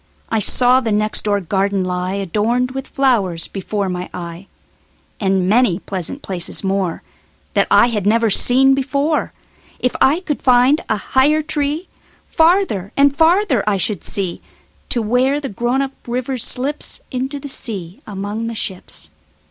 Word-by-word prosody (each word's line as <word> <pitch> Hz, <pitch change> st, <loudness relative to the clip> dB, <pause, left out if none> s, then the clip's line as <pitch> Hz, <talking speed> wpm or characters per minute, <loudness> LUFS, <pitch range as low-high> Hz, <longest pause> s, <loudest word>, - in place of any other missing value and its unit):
I 225 Hz, -, +1 dB
saw 250 Hz, +4 st, +5 dB
the 230 Hz, -4 st, -3 dB
next 215 Hz, +1 st, +1 dB
door 205 Hz, -1 st, +1 dB
garden 195 Hz, +1 st, -1 dB
lie, 180 Hz, +1 st, -2 dB
Adorned 215 Hz, +7 st, -1 dB
with 270 Hz, 0 st, -6 dB
flowers, 205 Hz, -, 0 dB
before 200 Hz, +1 st, -3 dB
my 180 Hz, 0 st, -4 dB
eye, 175 Hz, +2 st, -8 dB, 0.7 s
And 190 Hz, -2 st, +1 dB
many 215 Hz, -3 st, +3 dB
pleasant 190 Hz, -, -5 dB
places 180 Hz, 0 st, -1 dB
moreThat 190 Hz, -3 st, -3 dB
I 240 Hz, -, +5 dB
had 210 Hz, -4 st, -2 dB
never 225 Hz, 0 st, +2 dB
seen 265 Hz, +6 st, +5 dB
before. 280 Hz, +3 st, -1 dB, 0.5 s
If 250 Hz, -, -1 dB
I 300 Hz, +7 st, +4 dB
could 300 Hz, -6 st, -4 dB
find 255 Hz, +4 st, +4 dB
a 215 Hz, -, +1 dB
higher 285 Hz, +8 st, +2 dB
treeFarther 310 Hz, -, -1 dB
and 280 Hz, 0 st, +4 dB
farther 325 Hz, -, +3 dB
I 200 Hz, -, +1 dB
should 195 Hz, 0 st, 0 dB
see, 190 Hz, -4 st, -2 dB, 0.5 s
To 235 Hz, -, +3 dB
where 255 Hz, +6 st, +1 dB
the 275 Hz, -2 st, -5 dB
grown 240 Hz, +6 st, -1 dB
up 270 Hz, -, -4 dB, 0.2 s
river 250 Hz, +2 st, -3 dB
slipsInto 265 Hz, +1 st, -1 dB
the 285 Hz, -, -8 dB
sea 195 Hz, -9 st, -4 dB
among 205 Hz, +2 st, -4 dB
the 230 Hz, -, -5 dB
ships. 190 Hz, -3 st, -5 dB
230 Hz, 145 wpm, -18 LUFS, 195-270 Hz, 0.7 s, saw